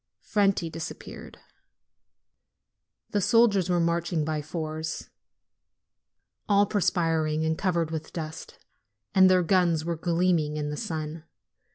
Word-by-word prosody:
Franti 195 -4 +1
disappeared. 165 0 -8 1.7
The 205 - +1
soldiers 200 -4 +3
were 175 -1 +2
marching 170 -1 0
by 155 -1 -2
fours, 155 +1 -5 1.4
all 200 0 +5
perspiring 165 -6 0
and 160 0 +1
covered 170 -3 0
with 160 -1 -5
dust, 160 -1 -7 0.6
and 190 -1 +6
their 185 -1 +4
guns 170 -3 +2
were 170 0 -1
gleaming 165 -2 +1
in 150 0 -2
the - - -3
sun. 155 +1 -5
165 Hz, 110 wpm, -27 LUFS, 155-185 Hz, 1.7 s, and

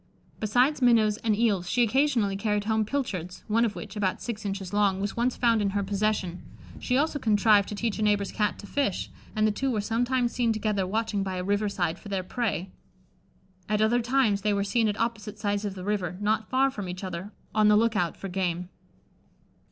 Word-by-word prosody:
Besides 250 +7 +2
minnows 225 -4 +4
and 220 -2 0
eels, 200 -6 +1
she 245 +4 +3
occasionally 235 -4 +2
carried 210 0 0
home 220 0 +1
pilchards, 200 - -3
one 225 +2 +2
of 220 -3 0
which, 200 - -8
about 200 -1 0
six 230 -2 -5
inches 195 -1 -4
long, 200 -2 +2
was 200 0 -3
once 240 +1 0
found 230 -3 +3
in 200 - +1
her 200 - 0
possession; 200 -3 -1 0.4
she 250 - 0
also 295 +1 +1
contrived 210 -3 +4
to 210 - -4
teach 225 0 -2
a - - -1
neighbour's 205 -2 +1
Cat 210 -1 0
to - - -10
fish, 205 -4 -1 0.2
and 215 0 +2
the 215 - +3
two 270 +6 -1
were 225 -4 0
sometimes 240 +3 0
seen 235 -2 +1
together 210 -3 0
watching 215 0 -1
by 190 -1 -3
a 180 - -3
river 205 +2 0
side 175 -3 -2
for 205 - -11
their 195 -2 -1
prey. 195 -3 -2 1.0
At 210 0 +1
other 225 +3 +3
times 240 -5 +2
they 210 0 +1
were 200 - +1
seen 220 +3 +1
at 210 0 -2
opposite 220 -2 -2
sides 205 0 -1
of 200 -2 -4
the 185 - -7
river, 185 -3 -2
not 215 +1 0
far 270 +1 +3
from 200 -6 -6
each 180 +2 -6
other, 185 +2 -5 0.2
on 215 -1 +4
the 210 0 +6
look 225 0 +2
out 175 -3 0
for 195 - -6
game. 180 -1 -2
210 Hz, 215 wpm, -27 LUFS, 200-230 Hz, 1.0 s, the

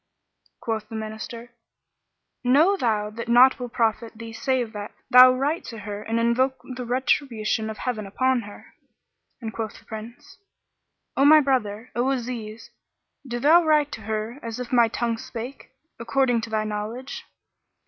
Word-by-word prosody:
Quoth 220 -2 -3
the 225 - -7
Minister, 220 +2 -7 0.9
"Know 300 +10 +4
thou 215 - 0
that 230 +2 -7
naught 250 +3 +6
will 245 -1 -5
profit 230 0 0
thee 225 0 -9
save 245 -1 -1
that 205 0 -7 0.2
thou 255 +1 +10
write 280 +6 -1
to 230 -1 -8
her 205 -1 -6
and 225 +1 -1
invoke 255 +3 +1 0.2
the 250 -1 -6
retribution 235 -4 0
of 215 - -6
Heaven 220 -5 -3
upon 255 +5 +1
her." 205 -1 -13 0.7
And 220 -2 -5
quoth 220 -2 -5
the - - -19
Prince, 235 - -10 0.8
"O 275 - +3
my 305 +2 +8
brother, 250 -5 -1
O 245 +2 +1
Aziz, 230 -4 -4 0.6
do 240 -1 -3
thou 320 +7 +6
write 300 -2 +3
to 220 - -7
her 220 +4 -4
as 230 +1 -6
if 250 0 -6
my 235 -2 +6
tongue 230 0 -2
spake, 255 0 -8 0.3
according 245 0 +1
to 225 - -6
thy 215 -1 0
knowledge." 215 +5 -5
235 Hz, 160 wpm, -24 LUFS, 220-260 Hz, 0.9 s, thou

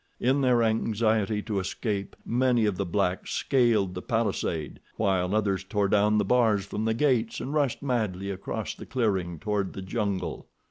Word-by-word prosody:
In 135 +3 +2
their 125 -3 +3
anxiety 110 -1 +1
to 105 -3 -2
escape, 100 +1 -3
many 125 -1 +2
of 105 -3 +1
the 100 - -2
blacks 90 0 -1
scaled 115 -8 +2
the - - -5
palisade, 80 -3 -2 0.2
while 95 -2 +1
others 100 -3 +1
tore 100 0 0
down 105 +1 +3
the - - +2
bars 110 -5 +3
from 105 +2 -3
the 110 0 +1
gates 120 -4 +1
and 140 - -4
rushed 145 -3 0
madly 105 -7 -1
across 95 0 -4
the - - -11
clearing 95 -9 -1
toward 105 0 -2
the 95 - -6
jungle. 100 -1 -3
105 Hz, 170 wpm, -27 LUFS, 95-115 Hz, 0.2 s, their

